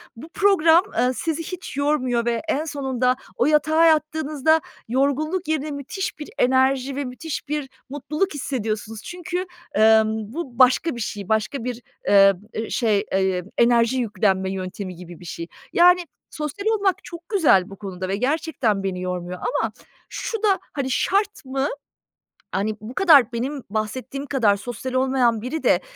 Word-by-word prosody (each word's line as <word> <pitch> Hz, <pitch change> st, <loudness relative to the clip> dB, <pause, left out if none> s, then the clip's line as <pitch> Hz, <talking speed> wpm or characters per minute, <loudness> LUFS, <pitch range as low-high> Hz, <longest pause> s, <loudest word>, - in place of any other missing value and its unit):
bu 280 Hz, +8 st, -11 dB
program, 355 Hz, -3 st, +4 dB
eee, 250 Hz, +2 st, +3 dB
sizi 330 Hz, +2 st, -2 dB
hiç 360 Hz, -4 st, -7 dB
yormuyor 260 Hz, -5 st, +1 dB
ve 235 Hz, -1 st, 0 dB
en 310 Hz, 0 st, 0 dB
sonunda 265 Hz, -4 st, 0 dB, 0.2 s
o 240 Hz, -, +2 dB
yatağa 310 Hz, +2 st, +4 dB
yattığınızda 310 Hz, -1 st, +2 dB, 0.3 s
yorgunluk 285 Hz, +8 st, 0 dB
yerine 310 Hz, -1 st, -1 dB
müthiş 285 Hz, +6 st, -5 dB
bir 300 Hz, -, -7 dB
enerji 260 Hz, +1 st, +2 dB
ve 285 Hz, 0 st, -2 dB
müthiş 275 Hz, +5 st, -6 dB
bir 295 Hz, -2 st, -3 dB, 0.2 s
mutluluk 300 Hz, +7 st, -2 dB
hissediyorsunuz. 225 Hz, -6 st, -3 dB
Çünkü, 360 Hz, +1 st, -4 dB, 0.3 s
emm, 220 Hz, 0 st, +3 dB
bu 270 Hz, -6 st, -6 dB
başka 255 Hz, +4 st, +4 dB
bir 235 Hz, -, -6 dB
şey, 205 Hz, -2 st, -5 dB
başka 220 Hz, +4 st, 0 dB
bir, 245 Hz, -1 st, -4 dB, 0.3 s
eee, 195 Hz, -1 st, +7 dB, 0.2 s
ı 220 Hz, 0 st, -3 dB
şey, 215 Hz, -4 st, +1 dB
eee, 190 Hz, -1 st, +1 dB
enerji 235 Hz, +1 st, +4 dB
yüklenme 195 Hz, -5 st, 0 dB
yöntemi 185 Hz, 0 st, -5 dB
gibi 175 Hz, -1 st, -11 dB
bir, 175 Hz, -, -13 dB
şey. 170 Hz, 0 st, -6 dB, 0.3 s
Yani, 355 Hz, +1 st, +5 dB, 0.2 s
sosyal 325 Hz, +6 st, -5 dB
olmak 405 Hz, -4 st, +1 dB
çok 340 Hz, -1 st, -10 dB
güzel 300 Hz, -, +4 dB
bu 195 Hz, -, -9 dB
konuda 185 Hz, -2 st, -6 dB
ve 195 Hz, -, -1 dB
gerçekten 255 Hz, -5 st, 0 dB
beni 185 Hz, -2 st, -3 dB
yormuyor 180 Hz, 0 st, -4 dB
ama -, -, -1 dB, 0.4 s
şu 450 Hz, -2 st, -4 dB
da, 395 Hz, -3 st, +3 dB
hani, 270 Hz, -2 st, -2 dB
şart 400 Hz, +3 st, 0 dB
mı? 270 Hz, +1 st, -1 dB, 0.8 s
Hani, 205 Hz, +3 st, -1 dB
bu 220 Hz, +3 st, -8 dB
kadar 300 Hz, -, +6 dB
benim 260 Hz, +3 st, -3 dB
bahsettiğim 240 Hz, +6 st, -4 dB
kadar 235 Hz, -8 st, +2 dB
sosyal 245 Hz, +4 st, -6 dB
olmayan 255 Hz, -3 st, +2 dB
biri 260 Hz, +7 st, -4 dB
de -, -, +4 dB
260 Hz, 155 wpm, -23 LUFS, 220-310 Hz, 0.8 s, eee